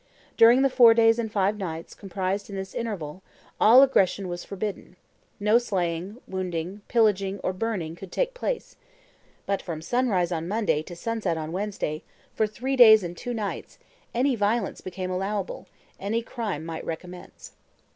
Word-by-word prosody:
During 235 Hz, +4 st, +6 dB
the 275 Hz, -, +4 dB
four 240 Hz, -3 st, +7 dB
days 225 Hz, 0 st, +4 dB
and 220 Hz, -2 st, -2 dB
five 205 Hz, 0 st, +1 dB
nights 165 Hz, -3 st, -5 dB
comprised 195 Hz, +1 st, -3 dB
in 200 Hz, -, -6 dB
this 190 Hz, -1 st, -6 dB
interval, 190 Hz, -7 st, -4 dB, 0.4 s
all 245 Hz, +5 st, +8 dB
aggression 195 Hz, -7 st, +2 dB
was 175 Hz, 0 st, -5 dB
forbidden; 200 Hz, -2 st, -5 dB, 0.4 s
no 210 Hz, +3 st, +4 dB
slaying, 185 Hz, -2 st, -2 dB
wounding, 185 Hz, +1 st, -4 dB
pillaging, 200 Hz, -4 st, +2 dB
or 185 Hz, -, 0 dB
burning 185 Hz, -6 st, -3 dB
could 185 Hz, +1 st, -11 dB
take -, -, -1 dB
place; -, -, -4 dB, 0.7 s
but 200 Hz, -1 st, -1 dB
from 165 Hz, -3 st, -5 dB
sunrise 190 Hz, -2 st, 0 dB
on 165 Hz, -1 st, -2 dB
Monday 205 Hz, -6 st, +1 dB
to 175 Hz, +2 st, -10 dB
sunset 220 Hz, -2 st, -2 dB
on 155 Hz, 0 st, -5 dB
Wednesday, 190 Hz, -5 st, -3 dB, 0.3 s
for 220 Hz, -, +1 dB
three 255 Hz, +6 st, -3 dB
clays 220 Hz, -5 st, +8 dB
and 175 Hz, 0 st, -5 dB
two 245 Hz, +5 st, -5 dB
nights, 210 Hz, -3 st, -5 dB, 0.3 s
any 255 Hz, +2 st, +1 dB
violence 210 Hz, 0 st, 0 dB
became 185 Hz, 0 st, -5 dB
allowable, 195 Hz, +1 st, -3 dB, 0.3 s
any 220 Hz, +4 st, -1 dB
crime 210 Hz, -10 st, -4 dB
might 165 Hz, -1 st, -5 dB
recommence. 180 Hz, +2 st, -8 dB
200 Hz, 155 wpm, -26 LUFS, 180-225 Hz, 0.7 s, all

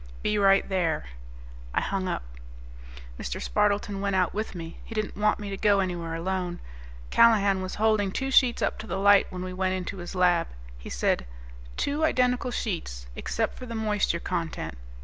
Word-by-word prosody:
"Be 210 Hz, 0 st, +1 dB
right 195 Hz, -1 st, +5 dB
there." 175 Hz, -, 0 dB, 0.7 s
I -, -, +3 dB
hung 195 Hz, -1 st, -2 dB
up. 175 Hz, -, -2 dB, 1.0 s
Mr. -, -, -4 dB
Spardleton 205 Hz, -1 st, 0 dB
went 200 Hz, -1 st, 0 dB
out 185 Hz, -1 st, +2 dB
with 215 Hz, -1 st, -3 dB
me; 165 Hz, -1 st, -7 dB
he 225 Hz, -, -9 dB
didn't 215 Hz, -1 st, -2 dB
want 210 Hz, +1 st, +2 dB
me 205 Hz, -1 st, -5 dB
to 195 Hz, -, -3 dB
go 205 Hz, -1 st, +4 dB
anywhere 175 Hz, -3 st, -2 dB
alone. 180 Hz, +1 st, -2 dB, 0.5 s
Callahan 200 Hz, -4 st, +5 dB
was 185 Hz, 0 st, -4 dB
holding 215 Hz, -2 st, +2 dB
two 270 Hz, +6 st, -2 dB
sheets 250 Hz, -2 st, +4 dB
up -, -, 0 dB
to 220 Hz, -, -7 dB
the -, -, -2 dB
light 200 Hz, 0 st, +6 dB
when 180 Hz, 0 st, -5 dB
we 185 Hz, 0 st, -5 dB
went 185 Hz, 0 st, 0 dB
into 185 Hz, +1 st, -4 dB
his 175 Hz, +1 st, -7 dB
lab. 175 Hz, -2 st, +3 dB, 0.3 s
He -, -, -9 dB
said, -, -, 0 dB, 0.5 s
"Two 290 Hz, +2 st, 0 dB
identical 250 Hz, -4 st, +2 dB
sheets, 165 Hz, -, -3 dB
except -, -, -2 dB
for 255 Hz, -, -7 dB
the 230 Hz, -, -5 dB
moisture 210 Hz, -5 st, 0 dB
content. 170 Hz, -, -3 dB
195 Hz, 180 wpm, -27 LUFS, 180-210 Hz, 1.0 s, light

